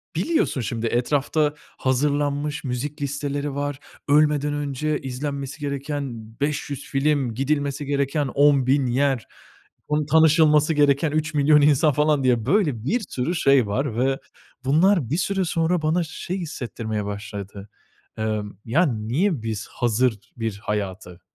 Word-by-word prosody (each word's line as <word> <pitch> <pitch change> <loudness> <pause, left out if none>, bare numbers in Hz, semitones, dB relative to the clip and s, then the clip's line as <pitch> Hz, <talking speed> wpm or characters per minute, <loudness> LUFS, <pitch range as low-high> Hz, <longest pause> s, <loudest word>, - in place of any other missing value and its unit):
biliyorsun, 315 - 0
şimdi, 115 0 -2
etrafta 145 +5 +1 0.2
hazırlanmış 145 +2 0
müzik 140 +3 -4
listeleri 140 0 -3
var, 145 -1 -3 0.3
ölmeden 150 0 +3
önce 145 +1 -2
izlenmesi 140 +2 -5
gereken 140 -1 -3 0.3
500 145 -1 -2
film, 135 -3 0
gidilmesi 140 +1 -1
gereken 140 +1 0
10.000 140 0 +3
yer, 135 0 +1 0.6
onu 150 0 0
tanışılması 155 0 +4
gereken 145 +1 +3
3.000.000 150 -1 +3
insan 150 +1 +4
falan 150 0 +2
diye 120 -4 +2
böyle 150 - +1
bir 235 - +1
sürü 130 +8 -2
şey 135 -8 +4
var 120 +2 -2
ve 135 +2 +1 0.5
bunlar 160 - +3
bir 155 - 0
süre 195 0 0
sonra 165 +1 0
bana 160 +3 +1
şey 170 +3 -5
hissettirmeye 115 - -4
başladı. 100 0 -7 0.5
Emm, 105 -2 -3
"Ya, 155 +11 +3
niye 130 - 0
biz 110 -1 -4
hazır 120 -1 +1 0.2
bir 115 -3 -3
hayatı, 95 -5 -4
140 Hz, 125 wpm, -23 LUFS, 125-150 Hz, 0.6 s, tanışılması